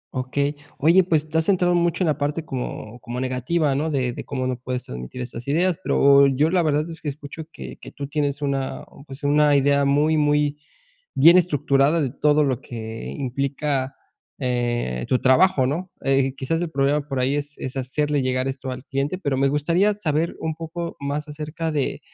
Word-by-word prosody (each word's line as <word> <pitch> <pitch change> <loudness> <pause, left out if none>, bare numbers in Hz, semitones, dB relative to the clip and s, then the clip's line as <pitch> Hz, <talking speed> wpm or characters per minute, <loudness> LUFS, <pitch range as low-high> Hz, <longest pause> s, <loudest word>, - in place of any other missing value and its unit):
Okey. 140 +3 -1 0.2
Oye, 170 +6 +5
pues 155 -3 +1
te 160 +1 +1
has 160 - 0
centrado 180 -2 +3
mucho 175 +1 +1
en - - +1
la 155 -1 0
parte 150 +3 -2
como 125 -4 -6
como 120 +2 -6
negativa, 130 +4 0
¿no? 150 +4 -1
De 130 -5 -1
de - - -7
cómo 130 -3 -3
no 130 -1 -1
puedes 125 0 -4
transmitir 60 - -7
estas 120 0 -7
ideas. 175 +4 +1
Pero 140 -3 +5
yo, 140 +4 +2
la 180 -1 +3
verdad, 155 0 +1
es 165 -1 -8
que 150 - -3
escucho 145 +2 -8
que 65 -1 -9
que - - -11
tú 140 - -6
tienes 145 0 -2
una, 135 -1 -2 0.2
pues, 135 +2 -10
una 145 0 +4
idea 140 0 +3
muy, 150 +3 +3
muy 150 0 +2 0.6
bien 165 +6 +7
estructurada 145 -2 +3
de 140 - 0
todo 150 +2 +2
lo 135 -2 0
que 110 -1 -7
implica, 135 0 -2 0.4
eh, 120 - -1
tu 130 - +3
trabajo, 130 +1 +4
¿no? 175 +7 -3
Eh, 135 -1 +2
quizás 135 +5 -2
el 170 - -3
problema 140 +1 +1
por 135 -3 -2
ahí 130 +3 +1
es 145 +1 -5
es 130 0 -5
hacerle 145 +2 0
llegar 130 +1 0
esto 135 0 -5
al 130 0 -6
cliente, 140 +6 -2
pero 140 -7 -1
me 135 +1 +3
gustaría 170 +8 +2
saber 165 -5 -1
un 160 -1 -2
poco 165 +1 -6
más 145 +2 -3
acerca 155 +2 -4
de 145 -3 -1
145 Hz, 195 wpm, -23 LUFS, 130-155 Hz, 0.6 s, bien